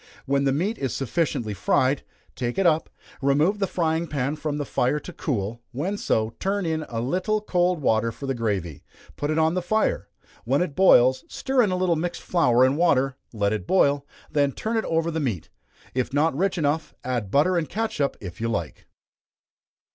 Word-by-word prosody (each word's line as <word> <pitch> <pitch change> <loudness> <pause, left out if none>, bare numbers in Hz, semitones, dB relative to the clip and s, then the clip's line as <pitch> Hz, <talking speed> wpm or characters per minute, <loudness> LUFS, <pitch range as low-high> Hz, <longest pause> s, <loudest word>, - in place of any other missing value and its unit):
When 140 +1 +1
the 135 - +3
meat 185 +11 -1
is 135 -4 -2
sufficiently 135 -5 -1
fried, 130 +8 +1 0.3
take 120 -1 -3
it 195 - +2
up, 160 -2 +3 0.3
remove 150 +9 +2
the 195 - +1
frying 165 -1 0
pan 140 -1 -1
from 150 -1 -3
the 145 - -2
fire 130 +3 0
to 180 - -10
cool; 115 -6 -3
when 170 +11 -2
so, 110 - 0
turn 195 0 -1
in 160 -1 -1
a 115 - -3
little 185 - 0
cold 180 -5 0
water 115 -1 +2
for 140 - -8
the 135 - -1
gravy, 100 - -3 0.3
put 145 - -3
it 155 - 0
on 160 0 +3
the 185 - 0
fire 215 +5 0 0.3
when 135 +7 +2
it 155 -6 -5
boils, 130 -8 +5
stir 265 -1 0
in 215 - +3
a 185 - 0
little 180 -2 +2
mixed 175 +2 -3
flour 125 -9 +3
and 135 +2 +1
water, 135 -6 +2 0.2
let 105 -2 0
it 100 -4 -4
boil, 145 -6 +3 0.3
then 145 -2 +2
turn 225 +1 -3
it 220 - 0
over 165 0 0
the 160 - -2
meat. 115 - -3 0.4
If 130 -1 -1
not 145 +1 +2
rich 190 +4 0
enough, 155 0 -1
add 120 -5 -2
butter 150 - +3
and 160 -5 -1
catsup 215 -9 -1
if 90 0 -8
you 115 - 0
like. 105 -3 -4
145 Hz, 195 wpm, -24 LUFS, 125-175 Hz, 0.4 s, boils